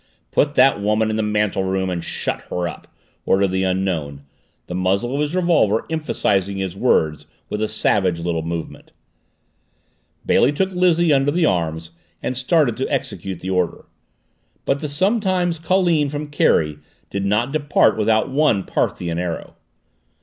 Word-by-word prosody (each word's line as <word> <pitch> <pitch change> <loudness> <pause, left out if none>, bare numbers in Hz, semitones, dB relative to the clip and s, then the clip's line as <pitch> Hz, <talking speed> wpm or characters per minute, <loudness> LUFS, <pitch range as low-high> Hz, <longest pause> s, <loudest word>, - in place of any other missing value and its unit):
"Put 145 0 +1
that 135 -6 +4
woman 105 +1 +1
in - - -1
the 110 - 0
mantel 105 -2 0
room 95 0 -1
and 85 -2 -3
shut - - -3
her 90 -1 -2
up!" 85 - -9 0.4
ordered 95 0 +2
the 95 +1 -1
Unknown, 90 -7 -2 0.4
the - - -7
muzzle 95 +7 0
of 140 - 0
his 150 +3 -1
revolver 165 - +2
emphasizing 100 - 0
his 95 -2 -3
words 80 - +1 0.2
with 105 - -3
a 110 - +1
savage 95 -5 +1
little 85 -1 -2
movement. 85 0 -6 1.3
Bailey 145 - +3
took 190 +6 0
Lizzie 175 -3 +3
under 135 0 +3
the 165 +3 +2
arms 80 - -1 0.3
and 130 - -2
started 130 -1 +1
to - - -3
execute 95 -3 -3
the 95 - -4
order. 90 -2 -1 0.8
But 135 - +1
the 150 - -4
sometime 185 +1 +1
colleen 165 -2 +1
from 145 +1 -5
Kerry 75 - +2 0.3
did 100 0 -2
not 105 +6 +1
depart 145 -1 +2
without 110 0 +2
one 135 -8 +2
Parthian 85 -2 -2
arrow. 90 -2 -4
105 Hz, 155 wpm, -20 LUFS, 90-150 Hz, 1.3 s, that